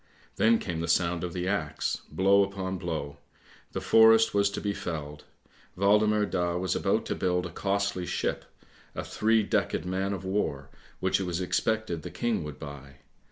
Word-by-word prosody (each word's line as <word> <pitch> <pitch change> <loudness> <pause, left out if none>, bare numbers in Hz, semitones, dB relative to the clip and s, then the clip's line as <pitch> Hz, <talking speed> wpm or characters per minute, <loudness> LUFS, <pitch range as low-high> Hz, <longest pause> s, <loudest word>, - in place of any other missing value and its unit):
Then 115 +1 +5
came 85 -6 -4
the 85 - -2
sound 85 0 +1
of 90 - -3
the 90 +1 -3
axe, 85 -7 -1
blow 95 +5 +4
upon 95 -1 -4
blow; 80 -5 -4 0.5
the - - -3
forest 115 0 +6
was 100 0 +3
to 100 - -4
be 100 -1 -2
felled. 75 -5 -6 0.5
Waldemar 105 +2 +3
Daa 90 -3 -1
was 95 +1 -1
about - - +1
to - - -2
build 90 -1 0
a 90 - -6
costly 100 -1 -1
ship, - - -2 0.5
a - - -3
three 110 0 +2
decked 100 - 0
man 95 +2 -1
of 95 -1 -6
war, 85 -8 -2 0.3
which 95 +1 +2
it 95 - -2
was 90 -1 -2
expected 95 -1 -1
the 90 - -7
King 110 +2 -1
would 75 -3 -7
buy. 70 -2 -10
95 Hz, 175 wpm, -28 LUFS, 85-100 Hz, 0.5 s, forest